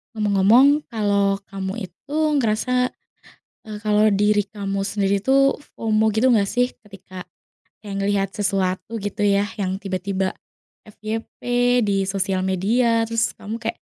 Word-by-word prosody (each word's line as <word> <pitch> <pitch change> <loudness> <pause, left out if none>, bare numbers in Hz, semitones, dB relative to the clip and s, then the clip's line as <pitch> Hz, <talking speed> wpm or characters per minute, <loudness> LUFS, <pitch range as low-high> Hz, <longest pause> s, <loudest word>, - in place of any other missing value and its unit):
Ngomong-ngomong 220 +8 +4
kalau 200 -3 +1 0.2
kamu 195 +2 -4
itu 285 - -7 0.2
ngerasa, 250 +2 0 0.8
eee, 215 -1 -7
kalau 210 0 +3
diri 205 +1 +2
kamu 195 -1 -3
sendiri 200 0 0
tuh 275 +3 +4 0.2
FOMO 220 -1 +1
gitu 220 +4 +1
nggak 200 -3 +2
sih? 245 +3 0
Ketika 190 -3 -11 0.6
kayak 205 -2 -7
ngelihat 195 -1 0
sesuatu 190 0 -1
gitu 205 +1 -2
ya 200 0 +2
yang 190 -1 -2
tiba-tiba 190 0 -2 0.5
FYP 215 +1 -7 0.4
di 200 -2 +1
sosial 190 -1 -1
media, 230 +5 +2
terus 230 0 0
kamu 215 +2 -6
kayak - - -4
205 Hz, 130 wpm, -22 LUFS, 195-225 Hz, 0.8 s, Ngomong-ngomong